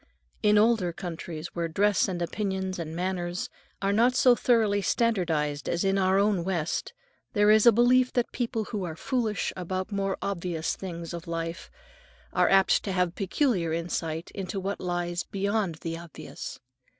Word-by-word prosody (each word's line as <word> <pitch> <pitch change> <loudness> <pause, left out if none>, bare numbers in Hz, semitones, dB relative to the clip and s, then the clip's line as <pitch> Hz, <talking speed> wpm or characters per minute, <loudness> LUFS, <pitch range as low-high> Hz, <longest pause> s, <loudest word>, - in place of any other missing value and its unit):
In 210 -1 +4
older 215 -5 +3
countries, 170 -2 -6
where 170 -1 -1
dress 200 +4 +2
and 175 -3 -2
opinions 190 0 -2
and 160 -1 -5
manners 175 0 -2 0.3
are 200 0 +2
not 240 +4 +4
so 255 -1 +6
thoroughly 220 -5 +2
standardized 165 -11 0
as 170 - 0
in 195 0 +2
our 190 0 +3
own 200 -3 +2
West, 170 - -2 0.4
there 205 -2 +5
is 215 +2 +6
a - - +10
belief 250 +3 +4
that 245 -2 0
people 230 -2 -2
who 210 -2 -4
are 165 -3 -4
foolish 225 0 -1
about 185 +2 -3
the - - -8
more 195 -1 -1
obvious 170 -4 -2
things 170 -3 -6
of 170 -1 -7
life 165 0 -4 0.6
are - - +3
apt 195 0 +4
to 200 - -2
have 180 -2 +1
peculiar 190 - 0
insight 165 -1 -3
into 195 0 -4
what 195 +1 -3
lies 175 -1 -2
beyond 200 -1 -1
the 165 -1 -3
obvious. 170 -2 -8
190 Hz, 165 wpm, -27 LUFS, 170-210 Hz, 0.6 s, a